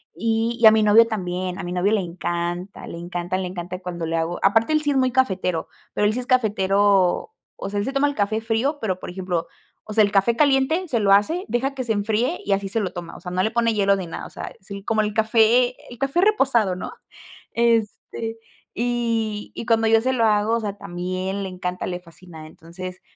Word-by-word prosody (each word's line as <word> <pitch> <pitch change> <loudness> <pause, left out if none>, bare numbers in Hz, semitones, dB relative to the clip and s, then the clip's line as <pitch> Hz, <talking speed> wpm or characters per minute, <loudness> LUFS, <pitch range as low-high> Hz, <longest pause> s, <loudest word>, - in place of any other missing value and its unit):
y 230 +1 0
y - - +6
a 220 - +11
mi 220 0 +3
novio 220 +2 +6
también, 185 -3 -3
a - - -4
mi 175 - -5
novio 180 +3 +1
le 210 - +2
encanta 175 +1 -4
le - - -7
encanta, 175 +1 -3
le 190 - -2
encanta 180 0 -6
cuando 175 -3 -5
le 165 +1 -1
hago, 165 +2 -2
aparte, 225 +9 +3
él 305 - +3
sí 290 - +1
es 275 - +1
muy 255 -1 +2
cafetero, 190 -9 0 0.3
pero 210 - +1
él 210 - +1
sí 245 - -2
es 250 - -5
cafetero, 200 - +2 0.2
o 195 - -6
sea, 205 0 -2
él 200 - -1
se 270 - -3
toma 275 +1 +2
el 285 - -3
café 210 0 0
frío, 235 +7 0
pero 185 -4 -1
por - - -7
ejemplo, 180 -2 -3 0.4
o 215 - -8
sea, 215 - +5
el 205 - +1
café 200 +4 +3
caliente 295 +6 +2
se 240 -6 0
lo 200 -2 +2
hace, 320 - +2
deja 265 +3 -1
que 260 - -4
se 230 -2 0
enfríe 220 - 0
y - - -2
así 195 0 -1
se 225 - -1
lo 195 -4 -2
toma, 175 -2 -7
o - - -10
sea, 180 - -7
no 185 +1 0
le 220 - 0
pone 230 -1 +1
hielo 200 -1 +3
ni 190 -3 -5
nada, - - -6
o - - -9
sea, - - -7
es 190 - -20 0.2
como 220 -2 +2
el 210 -1 -2
café 230 +3 +3 0.2
el 240 - -10
café 275 +6 +1
reposado, 270 - +3
¿no?, 180 - -6 0.6
este, 230 0 0 0.4
y 230 -3 -1
y - - -5
cuando 225 -1 +3
yo 225 0 +5
se 260 +2 0
lo 230 -3 +2
hago, 210 +1 +2
o - - -2
sea, 205 -2 -4
también 185 +1 -4
le 190 - -4
encanta, 180 0 -4
le 180 -1 -3
fascina, 165 -2 -13
entonces 180 +3 -9
210 Hz, 235 wpm, -22 LUFS, 185-235 Hz, 0.6 s, a